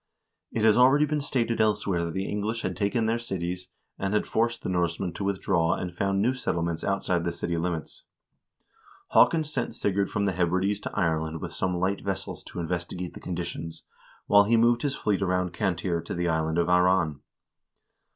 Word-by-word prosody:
It 110 - -1
has 110 -1 +5
already 135 +4 +6
been 150 -1 -1
stated 120 -5 0
elsewhere 100 -5 +1
that 85 - -4
the 95 +1 -1
English 110 +3 -2
had 95 - -2
taken 105 +3 0
their 115 +1 +1
cities, 90 -4 -4 0.3
and 100 +1 -1
had 105 - +1
forced 115 +1 0
the - - -2
Norsemen 85 0 -1
to 100 - -5
withdraw 95 -4 +1
and 90 -1 -5
found 100 +1 0
new 125 +3 +2
settlements 85 -9 -2
outside 95 -3 0
the 85 - -1
city 85 0 -3
limits. 85 -2 -4 1.0
Haakon 165 -1 +5
sent 155 +1 -3
Sigurd 100 0 0
from 100 - -1
the 100 - +2
Hebrides 95 +3 +1
to - - -6
Ireland 80 -1 0
with - - -6
some 90 -2 -1
light 95 +2 0
vessels 95 -1 -4
to - - -7
investigate 90 +1 -4
the - - -9
conditions, 85 -2 -5 0.4
while 100 0 +6
he 115 +2 +3
moved 120 +1 +4
his 140 -2 -1
fleet 105 -2 0
around 90 -2 0
Cantire 90 -3 -1
to - - -4
the 85 0 -1
island 80 0 0
of 85 0 +2
Aran. 90 -4 +3
95 Hz, 185 wpm, -27 LUFS, 85-105 Hz, 1.0 s, already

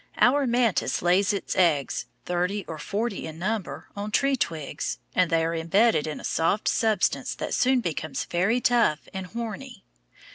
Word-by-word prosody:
Our 270 +2 +4
mantis 235 -7 +1
lays 185 +4 +3
its 200 - -3
eggs, 165 -7 +1 0.2
thirty 180 +3 -1
or 160 -2 -6
forty 205 -1 -3
in 160 0 -8
number, 190 +2 -3
on 205 +1 -4
tree 275 +5 +2
twigs, 160 - -3 0.2
and 180 -2 +3
they 165 -1 +2
are 165 - -1
embedded 170 +2 +2
in 155 - -4
a - - -11
soft 180 +6 0
substance 220 -4 +1
that - - -4
soon 255 0 +3
becomes 155 - -3
very 195 +8 +1
tough 230 -12 +2
and 190 -1 -5
horny. 230 +1 -6
195 Hz, 160 wpm, -26 LUFS, 165-230 Hz, 0.2 s, Our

